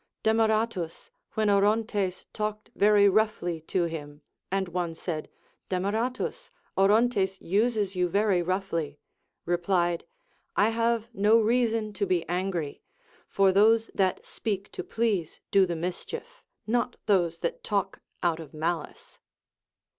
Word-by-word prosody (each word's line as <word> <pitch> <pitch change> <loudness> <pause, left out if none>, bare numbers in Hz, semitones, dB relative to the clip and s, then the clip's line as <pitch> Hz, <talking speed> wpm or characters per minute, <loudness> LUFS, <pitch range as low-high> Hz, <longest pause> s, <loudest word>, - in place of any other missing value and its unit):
Demaratus, 220 -5 +1
— - - -46
when 215 -1 +2
Orontes 205 -1 +1
talked 215 0 -4
very 205 0 +5
roughly 195 -5 +1
to 180 - +1
him, 150 -3 -6 0.3
and 195 -1 0
one 175 -1 -3
said, 160 -2 -4 0.4
Demaratus, 225 - -2 0.3
Orontes 195 -1 +3
uses 205 0 +1
you 180 -1 +1
very 200 -1 +2
roughly, 170 -5 -2 0.2
— - - -49
replied, 175 0 +1 0.5
I 205 - +4
have 230 0 0
no 210 +3 +4
reason 225 -1 +1
to 200 0 -1
be 180 -2 0
angry, 175 -4 -2 0.5
for 195 -1 +3
those 220 +3 +4
that 190 -2 0
speak 200 -3 -4
to 375 - -5
please 220 - -1
do 195 -1 +5
the 170 - -2
mischief, 465 - -5 0.2
not 240 +2 0
those 175 -5 +2
that 170 - -3
talk 200 -1 -1 0.2
out 170 -2 +1
of 155 -2 -10
malice. 160 0 -4
195 Hz, 130 wpm, -27 LUFS, 175-220 Hz, 0.5 s, very